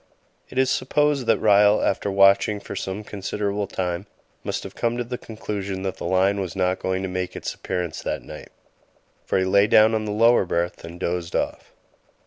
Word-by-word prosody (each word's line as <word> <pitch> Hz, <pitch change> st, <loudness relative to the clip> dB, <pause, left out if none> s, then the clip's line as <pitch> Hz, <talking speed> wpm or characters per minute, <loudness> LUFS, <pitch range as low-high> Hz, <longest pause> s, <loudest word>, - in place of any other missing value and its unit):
It -, -, -10 dB
is 130 Hz, 0 st, +3 dB
supposed 145 Hz, -1 st, +1 dB
that 115 Hz, -, +4 dB
Ryall, 105 Hz, 0 st, +5 dB
after 100 Hz, -, 0 dB
watching 100 Hz, +1 st, +4 dB
for 100 Hz, -, -8 dB
some 95 Hz, +2 st, -4 dB
considerable 100 Hz, 0 st, -3 dB
time, 90 Hz, 0 st, -3 dB, 0.4 s
must -, -, -3 dB
have -, -, -8 dB
come 120 Hz, 0 st, -1 dB
to 120 Hz, -, -1 dB
the 125 Hz, +1 st, -6 dB
conclusion 100 Hz, -3 st, -5 dB
that 95 Hz, -1 st, -3 dB
the -, -, -6 dB
lion 95 Hz, +2 st, +2 dB
was 95 Hz, -4 st, -4 dB
not 95 Hz, 0 st, 0 dB
going 95 Hz, 0 st, -2 dB
to -, -, -1 dB
make 90 Hz, 0 st, -4 dB
its -, -, -4 dB
appearance 90 Hz, -4 st, -4 dB
that -, -, -3 dB
night, -, -, -10 dB, 0.8 s
for -, -, 0 dB
he 95 Hz, -, +2 dB
lay 100 Hz, +2 st, +4 dB
down 110 Hz, +1 st, +5 dB
on 110 Hz, -1 st, 0 dB
the 105 Hz, -, -3 dB
lower 115 Hz, +2 st, +4 dB
berth 85 Hz, 0 st, -2 dB
and 85 Hz, +1 st, -9 dB
dozed 85 Hz, -1 st, -3 dB
off. -, -, -3 dB
100 Hz, 195 wpm, -23 LUFS, 95-110 Hz, 0.8 s, Ryall